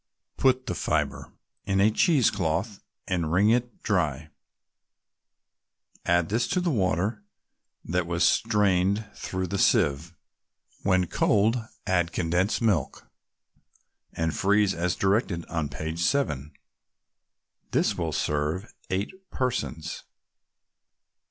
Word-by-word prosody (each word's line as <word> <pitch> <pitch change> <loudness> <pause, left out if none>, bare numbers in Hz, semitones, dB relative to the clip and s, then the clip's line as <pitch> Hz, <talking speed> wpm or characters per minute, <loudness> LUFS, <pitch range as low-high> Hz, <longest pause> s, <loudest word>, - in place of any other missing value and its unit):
Put 130 -1 +2
the - - -2
fibre 75 -4 -2 0.3
in 95 -1 0
a 105 +3 +5
cheese 140 - +3
cloth 95 +3 -2 0.3
and 85 -4 -1
wring 100 +6 +4
it 120 0 -1
dry; 80 -7 0 1.8
add 85 -1 +2
this 115 +3 +1
to 180 - 0
the 180 -2 0
water 105 - 0 0.6
that 90 0 -1
was 85 0 0
strained 100 0 +2
through 95 0 -3
the 100 +1 -3
sieve. 75 +3 +2 0.7
When 95 -2 +2
cold, 105 +6 +2 0.3
add 90 -3 +1
condensed 90 +7 0
milk, 90 - 0 1.1
and 80 -1 -1
freeze 100 0 +3
as 85 +1 -1
directed 95 -4 0
on 80 -4 -3
page 80 +5 -5
7. 75 - 0 1.2
This - - +1
will - - -2
serve 75 +7 -2 0.2
eight 140 - -4
persons. 120 - -3
95 Hz, 110 wpm, -26 LUFS, 85-105 Hz, 1.8 s, a